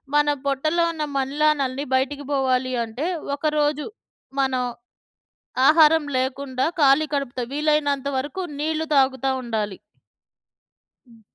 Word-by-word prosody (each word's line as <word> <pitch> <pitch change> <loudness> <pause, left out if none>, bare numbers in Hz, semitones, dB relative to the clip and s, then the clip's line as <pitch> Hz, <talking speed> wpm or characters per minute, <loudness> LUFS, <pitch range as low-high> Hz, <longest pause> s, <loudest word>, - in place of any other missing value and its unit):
మన 295 0 +4 0.2
పొట్టలో 310 +5 +1
ఉన్న 315 -2 -4
మన్లానల్ని 280 0 0
బయటికి 280 +2 -1
బోవాలి 260 -2 +1
అంటే 235 +7 -5 0.3
ఒక 300 +2 -2
రోజు 295 0 0 0.5
మనం 260 -2 +1 1.1
ఆహారం 315 0 +6
లేకుండా 260 0 -2 0.2
ఖాళీ 280 +2 +5
కడుపుతో 265 -3 -2
వీలైనంత 290 -2 +1
వరకు 290 +7 -4 0.2
నీళ్ళు 315 +1 -1
తాగుతా 265 -1 +2
ఉండాలి. 215 -5 -3 1.3
హ్మ్. 230 -2 -19
275 Hz, 105 wpm, -23 LUFS, 260-300 Hz, 1.3 s, ఆహారం